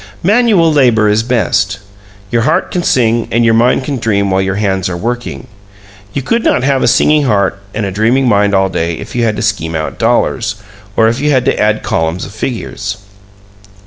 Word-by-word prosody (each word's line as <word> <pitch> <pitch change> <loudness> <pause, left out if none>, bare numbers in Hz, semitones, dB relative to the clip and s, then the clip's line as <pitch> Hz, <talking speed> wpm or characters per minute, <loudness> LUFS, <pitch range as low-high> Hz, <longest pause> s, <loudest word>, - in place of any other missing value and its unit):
Manual 200 -5 +3
labor 120 -7 +3
is 105 +1 +2
best. 110 -4 0 0.5
Your 120 - +1
heart 155 +10 0
can 180 - -1
sing 115 -6 +1
and 115 +1 +1
your 115 - +4
mind 120 +3 +2
can 140 0 -3
dream 100 -4 0
while 95 0 +2
your 95 0 -1
hands 95 -3 -1
are 85 - -4
working. 105 - -4 0.7
You 140 - -3
could 230 - 0
not 125 - +1
have 135 -1 +1
a - - +2
singing 150 -1 +3
heart 100 -5 +1 0.2
and 110 -1 -1
a 100 - -3
dreaming 115 +7 +1
mind 100 -2 +2
all 95 0 +3
day 85 -3 -2
if - - -9
you 120 - 0
had 110 -2 0
to 105 - -3
scheme 80 -6 -1
out 80 -1 -4
dollars, 115 -2 0 0.4
or 110 - +4
if 115 +3 0
you 150 +2 0
had 130 -3 +2
to - - 0
add 105 0 +1
columns 80 +2 -1
of 100 - -11
figures. 105 -2 -4
115 Hz, 205 wpm, -13 LUFS, 100-130 Hz, 0.7 s, your